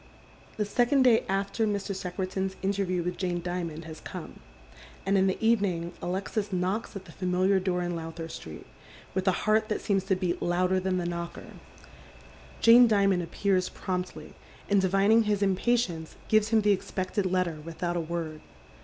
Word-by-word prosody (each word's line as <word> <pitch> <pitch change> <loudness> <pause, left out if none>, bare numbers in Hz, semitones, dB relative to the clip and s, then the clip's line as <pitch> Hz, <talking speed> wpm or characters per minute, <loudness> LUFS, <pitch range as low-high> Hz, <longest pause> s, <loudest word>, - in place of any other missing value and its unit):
The 210 - 0
second 245 +6 +3
day 240 -3 +5
after 195 +3 0
Mr. 200 -1 -2
Secretan's 190 +1 -3
interview 190 -2 0
with 175 0 -3
Jane 180 -2 -1
Dimond 170 -2 -4
lias 160 -1 -9
come, - - -8 0.7
and 195 +1 +2
in 195 0 +4
the 190 - 0
evening 195 -7 +1
Alexis 200 +3 -2
knocks 190 +5 -2
at 195 -1 -7
the 165 - -12
fami'iar 185 +2 +1
door 180 -1 0
in 175 0 -2
Lowther 165 0 -6
Street, 80 - -9 0.5
with 190 +1 -2
a - - +6
heart 215 +1 +3
that 210 - 0
seems 195 -2 0
to 190 -1 +2
beat 180 -2 -2
louder 180 +2 +1
than 185 0 -1
thl 175 - -2
knocker. 170 0 -5 1.1
Jane 240 +1 +8
Dimond 200 -4 +3
appears 185 +1 0
promptly, 180 -2 -5 0.3
and 200 -1 +3
divining 200 +4 +4
his 205 -1 +1
impatience, 190 -4 0
t'ves 215 -1 +4
him 220 -1 +3
the 205 0 +3
expected 190 0 -1
letter 180 -4 0
without 170 +2 -3
a 170 - 0
word. 160 -2 -4
190 Hz, 165 wpm, -28 LUFS, 175-205 Hz, 1.1 s, Jane